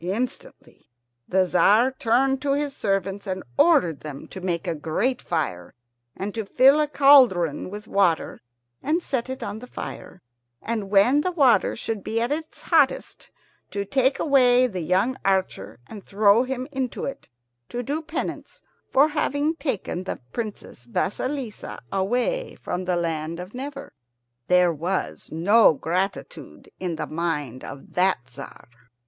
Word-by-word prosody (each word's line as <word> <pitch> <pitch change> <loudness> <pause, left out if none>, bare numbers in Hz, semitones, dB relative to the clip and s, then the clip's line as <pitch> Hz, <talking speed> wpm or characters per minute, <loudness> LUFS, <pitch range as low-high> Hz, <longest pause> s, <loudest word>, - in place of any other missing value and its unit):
Instantly 220 +8 -5 0.4
the 190 0 +2
Tzar 220 +7 +4
turned 265 +2 +1
to 280 -1 +1
his 285 -1 -2
servants 195 0 -2
and 185 -1 -3
ordered 265 - +4
them 145 -3 -8
to 190 - -8
make 175 -2 -2
a - - -1
great 170 - -1
fire, 90 - -3 0.4
and 200 +1 -4
to 225 - -3
fill 265 +8 +5
a 300 - +2
great 295 - -25
cauldron 240 - +5
with 210 +2 -8
water 180 -5 +1 0.4
and 325 +4 0
set 260 -2 -2
it 260 - -5
on 205 +2 -5
the 250 - -10
fire, 185 - -8 0.4
and, 220 -4 -4
when 210 +9 +4
the 365 - -1
water 280 -8 +3
should 220 -3 -4
be 225 - -1
at 235 +3 -1
its 315 +1 -5
hottest, 305 -6 +1 0.4
to 200 0 -3
take 265 +5 +1
the 250 - +3
young 190 +10 +1
archer 185 - -1
and 210 -3 -10
throw 205 +2 +4
him 260 0 -4
into 265 -3 -3
it, 275 - -7 0.4
to 245 +1 -4
do 290 +6 -2
penance 315 +1 -5 0.3
for 285 +3 +4
having 295 +1 0
taken 220 - -3
the - - -4
Princess 210 - -6
Vasilissa 250 - -3
away 245 - -1
from 180 +1 -4
the 180 -1 0
land 165 -1 -2
of 180 +3 -8
Never. 275 +2 -7 0.5
There 180 -1 +4
was 175 +5 -3
no 190 +3 +5
gratitude 185 +7 -4
in 180 -3 -3
the 160 - -3
mind 150 -6 -3
of 135 - -10
that 180 -9 +1
Tzar. 135 -1 -11
210 Hz, 150 wpm, -24 LUFS, 180-265 Hz, 0.5 s, fill